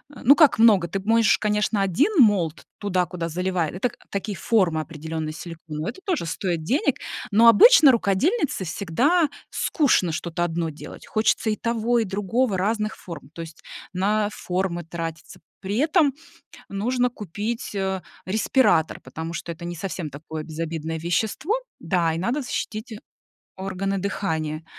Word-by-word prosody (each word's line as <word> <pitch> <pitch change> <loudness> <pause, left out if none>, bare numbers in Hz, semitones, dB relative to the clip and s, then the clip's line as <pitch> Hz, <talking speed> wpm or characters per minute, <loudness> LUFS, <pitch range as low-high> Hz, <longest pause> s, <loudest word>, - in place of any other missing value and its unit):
Э, - - -11
ну, 280 +4 +7
как 295 -8 +5
много, 205 -7 +6
ты 195 +4 -3
можешь, 225 +2 +3
конечно, 210 -1 +1
1 195 - +2
mold 175 -7 +1
туда, 185 -4 0
куда 170 -2 -4
заливает, 180 -1 -1
это, 215 +7 -1
так - - -18
такие 200 0 -3
формы 180 -8 +2
определённые 160 0 -5
силиконовые, 165 +1 -6
это 380 - -16
тоже 335 - -1
стоит 170 -2 -2
денег. 275 - +1 0.3
Но 230 +3 +6
обычно 290 - +8
рукодельнице 230 - +1
всегда 235 - +1 0.2
скучно 255 - +2
что-то 170 +1 -3
1 165 -1 -1
делать, 150 - -11
хочется 220 +1 +1
и 215 - +1
того, 235 +1 0
и 225 - +2
другого, 205 +2 0
разных 215 +2 -1
форм, 155 -5 -10
то 165 - -7
есть 160 -1 -10 0.3
на 205 +3 +1
формы 180 -2 -2
тратиться. 165 -1 -7 0.2
При 200 +2 -3
этом 305 0 +3 0.5
нужно 245 +5 0
купить, 210 +2 -5
э, 190 -1 -2 0.2
респиратор, 190 - +2
потому 160 +1 -7
что 170 - -6
это 170 +1 -9
не 175 0 -5
совсем 175 -3 -4
такое 155 +2 -7
безобидное 160 0 -4
вещество, 215 - -1 0.3
да, 170 -4 +1
и - - -3
надо 240 - -1
защитить 220 -2 -5 0.6
органы 195 +1 -2
дыхания. 160 -5 -2
190 Hz, 150 wpm, -24 LUFS, 165-225 Hz, 0.6 s, обычно